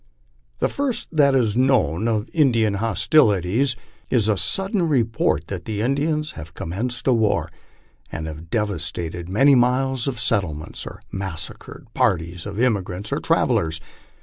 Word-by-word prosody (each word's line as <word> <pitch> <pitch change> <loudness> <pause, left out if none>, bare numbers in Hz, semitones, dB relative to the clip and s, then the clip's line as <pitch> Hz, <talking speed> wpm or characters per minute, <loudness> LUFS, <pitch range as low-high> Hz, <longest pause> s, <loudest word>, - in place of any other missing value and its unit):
The - - +1
first 275 -4 -2
that 140 -4 +4
is 115 -5 +2
known 115 - +2
of 110 0 0
In 150 -6 +4
dian 110 -4 +1
hostilities 115 - +2 0.3
is 115 -5 +2
a 105 - +3
sudden 190 - 0
report 115 -6 +1
that - - -6
the 105 -2 -3
Indians 150 +5 0
have 80 +2 -10
commenced 120 +9 -4
a 130 - +4
war, 110 -3 +1 0.6
and 80 - -4
have 80 +1 -8
devastated 85 -4 -3
many 135 +9 +5
miles 130 0 +2
of 125 -4 -2
settlements 95 -10 -2
or - - -9
massacred 95 -5 -5
parties 90 -7 0
of 100 +1 -5
emigrants 100 -5 -1
or - - 0
travellers. 80 0 +1
110 Hz, 145 wpm, -22 LUFS, 90-130 Hz, 0.6 s, many